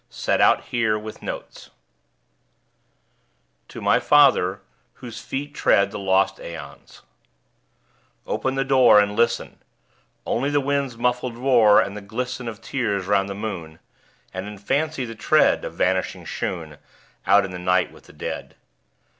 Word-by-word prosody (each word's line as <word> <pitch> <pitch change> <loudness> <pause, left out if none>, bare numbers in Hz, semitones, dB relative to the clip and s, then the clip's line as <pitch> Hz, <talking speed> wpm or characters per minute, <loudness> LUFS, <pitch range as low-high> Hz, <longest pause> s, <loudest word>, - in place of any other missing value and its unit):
Set - - -1
out - - +4
here, 110 -3 0
with 105 0 -8
Notes_. - - -8 2.0
TO - - -10
MY - - +3
FATHER 100 -10 +4 0.3
(Whose 120 -2 -9
feet 145 +2 -5
tread 100 -7 +2
the 105 - -6
lost 95 0 +1
aeons) 85 -1 -10 1.2
Open 130 0 -2
the 135 - +1
door, 130 -5 +6
And 105 0 +1
listen! 115 +1 0 0.7
Only 135 +5 0
the 145 0 +2
wind's 140 -3 -1
muffled 125 0 -1
roar, 120 -5 +5
And 100 - -1
the 105 - -7
glisten 125 +4 -5
Of 110 -1 -7
tears 100 -8 -2
'round 100 0 +1
the 100 - -5
moon. 85 -7 -6 0.6
And, 95 +2 -5
in 105 0 -8
fancy, 140 +6 -1
the 115 - -7
tread 110 - +3
Of - - -6
vanishing 95 0 -1
shoon 80 -5 -5 0.5
Out 100 -1 +5
in 95 - -7
the 90 - -6
night 90 +1 +1
with - - -18
the - - -17
Dead. - - -6
110 Hz, 145 wpm, -23 LUFS, 100-125 Hz, 2.0 s, door